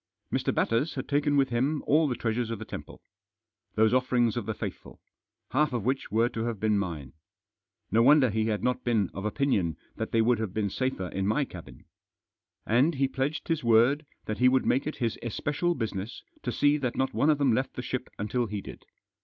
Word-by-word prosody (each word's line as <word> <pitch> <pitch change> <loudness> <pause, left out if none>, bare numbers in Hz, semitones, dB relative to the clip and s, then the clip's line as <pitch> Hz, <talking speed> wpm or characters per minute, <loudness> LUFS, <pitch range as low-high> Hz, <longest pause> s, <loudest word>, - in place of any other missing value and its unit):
Mr. - - +1
Batters 115 +8 0
had - - -4
taken 145 0 +2
with 135 -1 +3
him 135 +6 0
all 155 +2 +4
the 125 - -1
treasures 115 0 -1
of 115 - -3
the 110 - -7
temple. - - -9 0.7
Those 110 +1 +4
offerings 125 -3 +2
of 120 -3 -3
the 110 - -2
faithful, - - -7 0.5
half 140 +3 +2
of 115 -4 -2
which 130 +2 -1
were 115 +2 +3
to 115 -1 -3
have 115 -4 -3
been 105 -1 +2
mine. 80 -9 -5 0.8
No 115 - +4
wonder 135 -1 +6
he 110 +1 0
had 105 -2 -1
^ - - -11
not 125 0 0
been 110 -6 +1
of 95 +2 -5
opinion 105 - 0 0.2
that 110 - -3
they 115 - +2
would 120 -1 +2
have 110 -4 -4
been 105 -3 0
safer 130 -8 -2
In 95 0 -2
my 140 +7 +1
cabin. 90 -9 -12 0.8
And 130 +9 +3
he 135 0 +2
pledged 135 +3 -2
his 165 -3 0
word 120 +6 +4 0.2
that 110 - -4
he 125 0 +6
would 130 0 +2
make 135 +3 +1
it 155 - -3
his 115 -3 -2
especial 150 - -1
business 110 -1 -4 0.2
to - - -2
see 145 +1 +3
that 130 -5 -2
not 130 - 0
one 145 - +2
of 150 - +4
them 140 -4 +3
left 130 +4 -1
the 125 - -4
ship 130 +1 -4
until 115 +3 -1
he 105 0 -4
did. - - -10
120 Hz, 215 wpm, -28 LUFS, 110-135 Hz, 0.8 s, wonder